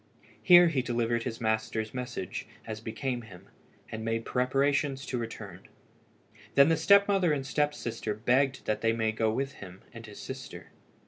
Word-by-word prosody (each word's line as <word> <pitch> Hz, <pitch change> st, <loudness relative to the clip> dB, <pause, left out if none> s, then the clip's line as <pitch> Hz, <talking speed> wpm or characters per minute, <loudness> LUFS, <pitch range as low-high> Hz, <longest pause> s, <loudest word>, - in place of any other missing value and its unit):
Here 175 Hz, -1 st, +8 dB
he 140 Hz, -5 st, 0 dB
delivered 120 Hz, -1 st, -1 dB
his 115 Hz, -3 st, -4 dB
master's 110 Hz, 0 st, -1 dB
message, 125 Hz, -7 st, -5 dB, 0.2 s
as 110 Hz, -1 st, -6 dB
became 120 Hz, +3 st, -3 dB
him, 95 Hz, -6 st, -14 dB, 0.4 s
and 110 Hz, 0 st, -5 dB
made 115 Hz, 0 st, -2 dB
preparations 135 Hz, +1 st, 0 dB
to 125 Hz, -, -3 dB
return. 105 Hz, -5 st, -8 dB, 0.9 s
Then 140 Hz, +2 st, +7 dB
the 165 Hz, -, +4 dB
step 200 Hz, +5 st, +5 dB
mother 195 Hz, -5 st, +2 dB
and 140 Hz, -3 st, -1 dB
step 145 Hz, +1 st, 0 dB
sister 110 Hz, -5 st, -4 dB
begged 130 Hz, +5 st, +1 dB
that 105 Hz, 0 st, -1 dB
they 115 Hz, 0 st, +2 dB
might 110 Hz, -1 st, -1 dB
go 110 Hz, 0 st, +1 dB
with 135 Hz, +4 st, -2 dB
him 95 Hz, -1 st, -10 dB
and 115 Hz, -1 st, -10 dB
his 105 Hz, -, -11 dB
sister. -, -, -8 dB
120 Hz, 170 wpm, -29 LUFS, 110-140 Hz, 0.9 s, Here